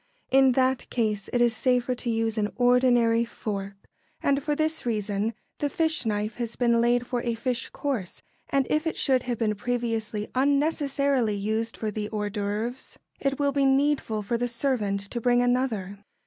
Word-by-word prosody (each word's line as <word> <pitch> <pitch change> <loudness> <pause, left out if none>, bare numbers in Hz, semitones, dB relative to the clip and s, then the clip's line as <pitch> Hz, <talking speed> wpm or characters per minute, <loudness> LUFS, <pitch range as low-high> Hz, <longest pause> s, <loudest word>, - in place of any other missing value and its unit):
In 265 -1 +6
that 260 0 +1
case 210 -4 -1
it 245 - +1
is 240 -1 +3
safer 250 +1 +1
to 245 0 -4
use 225 -1 0
an 210 -2 -1
ordinary 245 -2 +4
fork; 200 -4 -5 0.5
and 280 0 +2
for 295 +1 -1
this 315 +1 -1
reason: 210 -1 -1 0.2
the 290 - 0
fish 320 -5 0
knife 210 +1 -1
has 235 -2 -3
been 235 -2 +3
laid 240 +1 +2
for 245 -1 -2
a 235 -1 -1
fish 245 +2 -2
course, 250 -11 -4 0.3
and 275 -1 +2
if 310 +2 +1
it 320 - -2
should 260 -2 +3
have 245 -1 -3
been 215 -2 +1
previously 225 -1 -2
unnecessarily 280 -4 +1
used 220 +3 -2
for 215 -1 -2
the 210 0 -4
hors 210 -1 -2
d'œuvre, 210 +5 -3 0.2
it 275 -1 0
will 285 -1 +1
be 280 0 +1
needful 270 -5 +2
for 230 +3 -1
the 245 - 0
servant 230 -5 -1
to 220 +4 -5
bring 245 +1 +3
another. 230 -6 0
240 Hz, 175 wpm, -26 LUFS, 215-265 Hz, 0.5 s, In